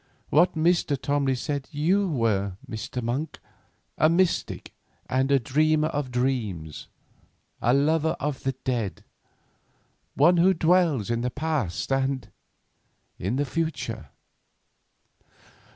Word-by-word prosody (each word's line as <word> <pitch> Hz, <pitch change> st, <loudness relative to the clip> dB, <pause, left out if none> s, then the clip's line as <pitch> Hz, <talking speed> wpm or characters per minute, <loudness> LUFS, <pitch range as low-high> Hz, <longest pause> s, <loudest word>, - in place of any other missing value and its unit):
What 170 Hz, +6 st, +4 dB
Mr. 160 Hz, -3 st, +2 dB
Tomley 140 Hz, -1 st, 0 dB
said 140 Hz, +1 st, -3 dB
you 180 Hz, +6 st, +1 dB
were, 100 Hz, -, 0 dB
Mr. 115 Hz, +2 st, -5 dB
Monk, 130 Hz, +7 st, -3 dB, 0.6 s
a 155 Hz, -, +5 dB
mystic 175 Hz, +2 st, 0 dB, 0.3 s
and 130 Hz, +2 st, 0 dB
a 140 Hz, -, +6 dB
dreamer 155 Hz, +4 st, +2 dB
of 145 Hz, -4 st, -3 dB
dreams; 115 Hz, -, -2 dB, 0.7 s
a 120 Hz, -, +3 dB
lover 160 Hz, +3 st, +2 dB
of 145 Hz, -1 st, -3 dB
the 135 Hz, -, -1 dB
dead; 120 Hz, -8 st, -3 dB, 1.1 s
one 175 Hz, +5 st, +5 dB
who 185 Hz, +3 st, +4 dB
dwells 165 Hz, -, +2 dB
in 115 Hz, 0 st, 0 dB
the 125 Hz, -, -1 dB
past, 140 Hz, -, -2 dB
and—in 130 Hz, -5 st, -5 dB
the 145 Hz, +2 st, 0 dB
future." 130 Hz, -, -3 dB
140 Hz, 110 wpm, -26 LUFS, 120-155 Hz, 1.1 s, a